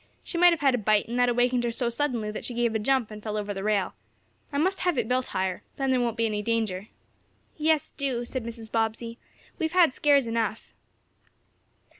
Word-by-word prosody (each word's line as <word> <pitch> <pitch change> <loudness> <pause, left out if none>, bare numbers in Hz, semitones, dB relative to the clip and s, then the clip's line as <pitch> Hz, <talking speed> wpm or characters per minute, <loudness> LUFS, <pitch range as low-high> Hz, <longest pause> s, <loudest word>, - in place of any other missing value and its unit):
She - - -7
might 355 0 +8
have 335 -3 0
had 275 -2 +4
a 250 - +1
bite, 215 0 +2
and 240 +2 -2
that 245 0 +4
awakened 245 0 +2
her 240 - 0
so 235 +1 -2
suddenly 235 -4 -1
that 215 - -6
she 245 - -3
gave 235 -1 +1
a 220 - 0
jump 245 0 +1
and 210 0 -8
fell 215 0 -3
over 205 -1 -3
the 195 - -5
rail. 205 -3 +1 0.6
I 280 - -2
must 375 +6 +1
have 355 -5 +1
it - - 0
built 255 +1 0
higher. 185 -1 -2
Then 270 -1 0
there 255 - +3
won't 235 -1 -1
be 230 - +2
any 210 -2 -1
danger." 215 -3 -1 0.7
"Yes, 310 -1 +1
do," 255 -4 -2
said 255 0 -4
Mrs. 225 -1 -8
Bobbsey. 230 +1 -1 0.4
"We've 320 -1 -1
had 345 -7 +5
scares 285 -2 +4
enough." 230 -1 -2
235 Hz, 215 wpm, -27 LUFS, 220-270 Hz, 0.7 s, might